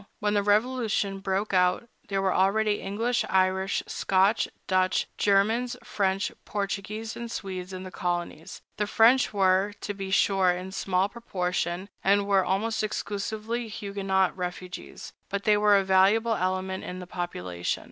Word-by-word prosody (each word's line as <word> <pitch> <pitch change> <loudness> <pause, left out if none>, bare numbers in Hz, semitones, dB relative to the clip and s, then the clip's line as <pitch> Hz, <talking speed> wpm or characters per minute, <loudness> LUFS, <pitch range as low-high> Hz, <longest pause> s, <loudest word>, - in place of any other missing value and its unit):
When 210 0 0
the 205 - +3
Revolution 210 -2 +1
broke 195 +1 -2
out, 180 +5 +2 0.2
there 195 -1 -1
were 190 - +2
already 205 +2 +2
English, 225 +5 0
Irish, 190 +1 +1
Scotch, 195 +3 +2 0.2
Dutch, 185 -1 +1
Germans, 220 +5 +2
French, 195 0 0
Portuguese, 210 +2 -4
and 235 0 -6
Swedes 185 -4 -5
in 185 0 -6
the 185 - -8
colonies. 175 -3 -4
The 210 - 0
French 235 +5 +4
were, 195 0 +2
to 205 - -3
be 195 -1 -6
sure, 190 -1 +3
in 180 +1 -2
small 190 0 0
proportion, 185 -4 -3 0.2
and 200 +1 +3
were 195 -1 +3
almost 200 +5 0
exclusively 215 +2 -3
Huguenot 195 -3 -1
refugees, 180 0 -7 0.2
but 200 0 -3
they 210 - +4
were 205 -1 +5
a 195 - +2
valuable 195 +5 +4
element 185 -1 -2
in 180 - -6
the 180 - -7
population. 90 - -3
195 Hz, 145 wpm, -27 LUFS, 185-210 Hz, 0.2 s, were